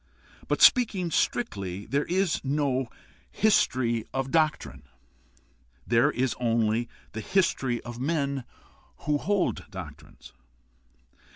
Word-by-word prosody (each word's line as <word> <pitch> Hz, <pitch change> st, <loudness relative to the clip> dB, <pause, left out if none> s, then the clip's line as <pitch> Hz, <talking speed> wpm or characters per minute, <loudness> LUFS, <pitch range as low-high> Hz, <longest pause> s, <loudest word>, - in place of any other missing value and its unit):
But -, -, +1 dB
speaking 200 Hz, -, +5 dB
strictly, 100 Hz, -, -1 dB
there 140 Hz, +2 st, 0 dB
is 185 Hz, 0 st, 0 dB
no 135 Hz, -2 st, 0 dB, 0.4 s
history 125 Hz, -, +2 dB
of 135 Hz, 0 st, -3 dB
doctrine; 150 Hz, -, 0 dB, 1.0 s
there 120 Hz, +5 st, +3 dB
is 130 Hz, -3 st, 0 dB
only 115 Hz, -1 st, +1 dB, 0.2 s
the 110 Hz, -, -5 dB
history 135 Hz, -, +1 dB
of 120 Hz, 0 st, -8 dB
men 140 Hz, -2 st, -1 dB, 0.6 s
who 150 Hz, 0 st, +1 dB
hold 200 Hz, +2 st, -1 dB
doctrines. -, -, -11 dB
135 Hz, 100 wpm, -27 LUFS, 120-160 Hz, 1.0 s, speaking